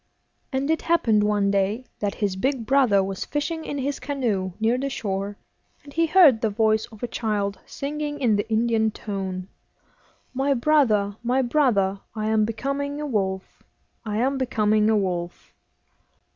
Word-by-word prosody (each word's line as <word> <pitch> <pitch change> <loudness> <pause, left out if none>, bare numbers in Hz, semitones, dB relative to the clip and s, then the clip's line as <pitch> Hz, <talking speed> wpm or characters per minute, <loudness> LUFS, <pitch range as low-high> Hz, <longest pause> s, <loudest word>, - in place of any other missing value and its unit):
And 275 +2 0
it 320 - 0
happened 225 -11 +2
one 205 -1 +2
day 200 +5 0
that 205 -1 -2
his 200 -3 -1
big 255 +3 -1
brother 250 -7 +4
was 195 0 -4
fishing 320 +3 -3
in 290 - -4
his 275 +1 -2
canoe 220 -10 -2
near 225 +2 +2
the 275 +1 -2
shore, 200 -4 -3 0.5
and 285 - -13
he 330 0 +2
heard 310 -10 +6
the 220 - +1
voice 220 +1 +1
of 220 -1 -14
a - - 0
child 205 -4 -2
singing 295 +1 -4
in 235 -6 +3
the 205 - -2
Indian 220 0 +2
tone 190 -3 -5 0.9
'My 270 +2 +1
brother, 230 -7 +2
my 250 +3 +1
brother! 235 -8 +2 0.2
I 215 0 -2
am 220 -1 +3
becoming 275 +6 -3
a 300 - -3
wolf, 190 -7 -3 0.4
I 210 -2 -3
am 265 +4 +1
becoming 215 -4 +2
a 220 - +3
wolf! 175 -3 -3
220 Hz, 160 wpm, -24 LUFS, 205-275 Hz, 0.9 s, heard